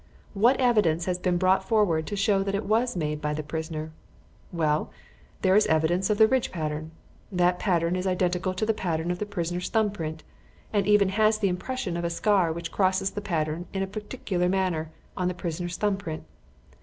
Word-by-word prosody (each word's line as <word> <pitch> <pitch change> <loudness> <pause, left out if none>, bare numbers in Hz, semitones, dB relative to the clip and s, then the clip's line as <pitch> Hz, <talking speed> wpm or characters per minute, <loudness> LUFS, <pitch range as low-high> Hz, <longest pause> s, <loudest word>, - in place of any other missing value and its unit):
What 235 +6 +3
evidence 210 -10 +3
has 180 -1 -1
been 180 -1 +1
brought 190 +1 +3
forward 190 -7 +2
to 205 - -3
show 200 0 +2
that 195 0 -1
it 200 - -2
was 230 +3 +1
made 150 -3 -2
by 150 0 -1
the 155 - -3
prisoner? 160 +1 -5 0.6
Well, 155 -3 0 0.5
there 190 0 +4
is 210 - +5
the - - -3
evidence 175 +5 +1
of 210 - +2
the 220 0 +7
ridge 260 +1 +1
pattern. 155 -2 -3 0.4
That 180 -1 +2
pattern 170 -3 +1
is 185 +1 -2
identical 185 0 0
with - - +1
the 225 - +2
pattern 170 -4 -2
of 180 - -3
the 210 - -3
prisoner's 175 -2 -3
thumb 220 -2 +2
print, 160 -5 -5 0.5
and 205 -1 +1
even 210 -2 +5
has 215 +2 +3
the 205 -2 +1
impression 185 +1 -3
of 170 - -3
a 170 - 0
scar 185 -1 +2
which 170 0 -5
crosses 190 0 +1
the 205 - -5
pattern 165 -3 -2
in 195 0 -1
a - - 0
particular 200 -3 -2
manner 180 -4 0 0.3
in 180 - +1
the 180 - -2
prisoner's 175 0 -4
thumb 205 -2 +1
print. 160 -5 -6
185 Hz, 205 wpm, -26 LUFS, 170-205 Hz, 0.6 s, the